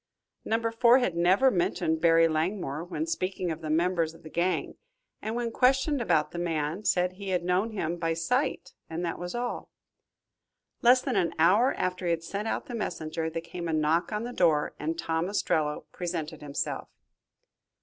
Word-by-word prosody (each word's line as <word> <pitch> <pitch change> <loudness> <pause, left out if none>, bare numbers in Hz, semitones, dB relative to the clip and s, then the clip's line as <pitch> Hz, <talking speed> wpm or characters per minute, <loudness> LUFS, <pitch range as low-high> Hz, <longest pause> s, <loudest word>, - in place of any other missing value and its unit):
Number 225 +1 0
Four 235 +2 +5
had 245 -10 0
never 185 +10 +4
mentioned 170 -4 0
Barry 165 0 +5
Langmore 160 -1 -1
when 185 - -3
speaking 185 - -2
of 160 +1 -5
the 155 - -5
members 165 0 +1
of 165 - -17
the 155 - -10
gang, 180 +2 -1 0.4
and 220 +2 -3
when 240 -1 -2
questioned 265 +3 +2
about 165 -9 +2
the 175 - -5
man, 165 +2 -2
said 180 0 +2
he 195 +1 -7
had 180 -2 0
known 180 +5 +1
him 175 -4 -2
by 165 -1 -1
sight 250 - -1 0.2
and 165 +2 -3
that 170 - -3
was 175 +5 -5
all. 245 0 -3 1.1
Less 250 +1 +6
than 260 -4 -1
an 175 -3 +1
hour 200 +11 +4
after 180 0 -2
he - - +2
had 165 -1 0
sent 200 +5 -4
out - - -2
the 255 - -8
messenger, 160 -7 -3
there 165 +1 -5
came 170 0 -6
a 165 - -1
knock 155 +3 +1
on 210 +1 -2
the 245 +1 -5
door 160 -7 +2
and 160 +2 -2
Tom 165 +1 -1
Ostrello 155 -7 0
presented 165 -3 -4
himself. 145 -1 -4
175 Hz, 185 wpm, -28 LUFS, 165-210 Hz, 1.1 s, Less